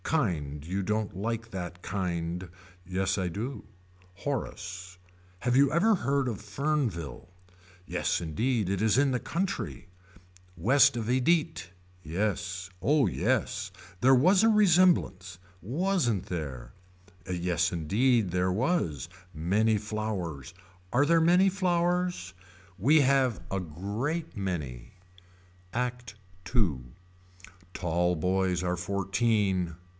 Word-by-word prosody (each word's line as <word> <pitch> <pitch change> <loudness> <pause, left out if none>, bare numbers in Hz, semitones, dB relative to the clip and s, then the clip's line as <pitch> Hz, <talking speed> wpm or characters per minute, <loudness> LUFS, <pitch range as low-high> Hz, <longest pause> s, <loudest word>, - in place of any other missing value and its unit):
Kind 80 - -1
you 95 +2 -2
don't 105 0 -1
like 115 +3 -3
that 90 -2 -6
kind. 90 -2 -3 0.4
Yes 95 +2 -1
I 95 -2 -1
do. 115 +10 -5 0.5
Horace. 90 -7 -5 0.4
Have 125 +4 0
you 140 +1 +5
ever 200 +8 +4
heard 140 -6 0
of 110 -5 -3
Fernville. 110 - -2 0.6
Yes - - -1
indeed 105 - -1
it 95 +1 -1
is 110 +1 +3
in 140 0 +3
the 125 - -1
country. 190 - -3 0.7
West 120 +6 +4
of 115 - -2
Edite. 150 - +1 0.4
Yes. 90 +1 -2
Oh 145 - +3
yes. - - -1 0.3
There 130 +1 +6
was 180 - +5
resemblance. 175 - +3 0.2
Wasn't 135 - 0
there. 75 -8 -5 0.6
Yes 85 -1 0
indeed 105 +5 +2
there 90 +1 +1
was. 105 - 0 0.3
Many 105 +8 +2
flowers. 100 - -4 0.4
Are 140 +4 +3
there 165 +2 +4
many 180 +4 +5
flowers. 180 - 0 0.4
We 140 +11 +5
have 135 -4 +2
a 95 -1 -1
great 105 - -4
many. 75 - -4 0.8
ACT 125 -2 -3 0.4
II. 90 - +2 0.9
Tall 90 0 0
boys 90 +2 +1
are 90 -1 0
fourteen. 95 -1 0
105 Hz, 110 wpm, -28 LUFS, 90-135 Hz, 0.9 s, There